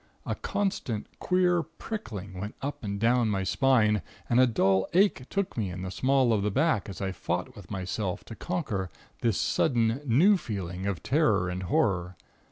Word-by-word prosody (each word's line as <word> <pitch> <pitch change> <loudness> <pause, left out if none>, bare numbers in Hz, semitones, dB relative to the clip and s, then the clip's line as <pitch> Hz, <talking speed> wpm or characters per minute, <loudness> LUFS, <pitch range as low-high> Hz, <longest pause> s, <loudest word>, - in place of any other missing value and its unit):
A - - -1
constant, 160 - -2
queer 180 -1 +2
prickling 115 - -7
went 105 +3 -5
up 140 -2 -5
and 100 -1 -3
down 115 +1 +3
my 95 -2 0
spine, 110 -1 +3 0.3
and 120 - +3
a 130 - +6
dull 95 -4 +2
ache 185 -8 +3
took 200 -1 -2
me 105 -5 -1
in 90 +1 -6
the 95 - -4
small 130 0 +3
of 105 - +1
the 105 - +1
back, 135 -3 +1
as 95 - -7
I 95 -1 -1
fought 95 - -3
with - - -12
myself 95 0 -3
to 115 - -9
conquer 125 - -3 0.3
this - - +1
sudden 115 +1 +1
new 155 - +5
feeling 95 - -4
of 100 -4 -3
terror 110 - +2
and 90 +1 -3
horror. 90 0 0
110 Hz, 175 wpm, -28 LUFS, 95-140 Hz, 0.3 s, a